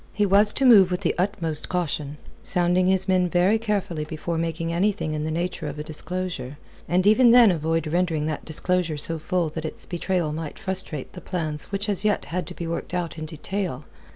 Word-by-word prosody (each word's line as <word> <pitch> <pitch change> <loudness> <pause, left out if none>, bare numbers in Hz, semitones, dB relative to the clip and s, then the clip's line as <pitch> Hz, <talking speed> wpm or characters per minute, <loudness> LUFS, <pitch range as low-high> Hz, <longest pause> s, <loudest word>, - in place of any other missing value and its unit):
He 210 - +1
was 205 +2 +7
to 270 - +1
move 205 -7 +7
with 180 -1 -2
the - - +1
utmost 175 -5 -1
caution, 150 -5 -2 0.2
sounding 180 0 +2
his 190 0 +2
men 185 -1 +2
very 185 +6 +3
carefully 200 -8 -2
before 155 +2 -4
making 165 0 -2
anything 190 -3 0
in 150 0 -2
the - - -2
nature 170 -1 -3
of 145 0 -6
a 150 - -4
disclosure, 155 -4 -5 0.3
and 180 +2 +2
even 235 +4 +6
then 235 -3 +7
avoid 165 -1 -1
rendering 165 -1 0
that 155 -1 -3
disclosure 170 0 -1
so 165 +2 -1
full 170 +1 -1
that 160 +1 -6
its 160 - -3
betrayal 175 -3 -1
might 155 -1 -6
frustrate 185 -7 -4
the 180 - -9
plans 155 -5 -2
which 200 +1 -3
as 205 -1 +2
yet 210 -1 +1
had 175 -1 -4
to - - -8
be 170 - -5
worked 170 +2 -4
out 170 -2 -3
in 155 - -5
detail. 160 -2 -4
175 Hz, 205 wpm, -24 LUFS, 155-190 Hz, 0.3 s, was